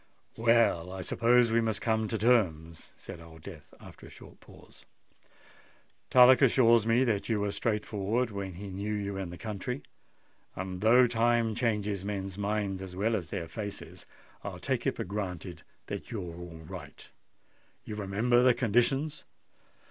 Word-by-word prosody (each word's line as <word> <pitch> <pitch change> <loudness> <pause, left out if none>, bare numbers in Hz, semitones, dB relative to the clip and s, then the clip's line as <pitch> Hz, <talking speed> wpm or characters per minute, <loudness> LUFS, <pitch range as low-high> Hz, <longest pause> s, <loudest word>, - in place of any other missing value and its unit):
"Well, 115 -7 +3
I 95 0 -6
suppose 120 +5 +3
we 115 +1 +3
must 110 -2 -1
come 110 -1 0
to 110 - -2
terms," 85 -9 +1
said 85 - -10
Old 80 -1 -14
Death - - -11
after - - -13
a - - -13
short - - -15
pause. - - -17 1.3
"Tullock 125 0 +7
assures 115 -4 +5
me 115 +3 +4
that 110 -5 -1
you 110 -2 +1
were 100 0 -1
straight 105 0 -1
forward 110 +3 -1
when 95 -3 -5
he 100 +2 -7
knew 100 +3 -3
you 100 -1 -3
in 95 -2 -4
the 90 - -8
country, 110 +6 -5 0.7
and 95 0 -5
though 120 +4 +6
time 115 -1 +2
changes 105 -4 -1
men's 100 -2 -4
minds 100 -1 -2
as 95 -1 -8
well 110 +4 +1
as 90 -6 -3
their 85 0 -5
faces, 100 +3 -7 0.4
I'll - - -6
take - - -2
it - - 0
for - - -3
granted 90 -4 -5 0.2
that - - -6
you're 90 -7 -5
all 85 -2 -10
right. 90 -7 -10 0.8
You - - -7
remember 105 +4 +1
the 125 -1 +5
conditions?" 135 +6 +1
105 Hz, 165 wpm, -29 LUFS, 95-115 Hz, 1.3 s, Tullock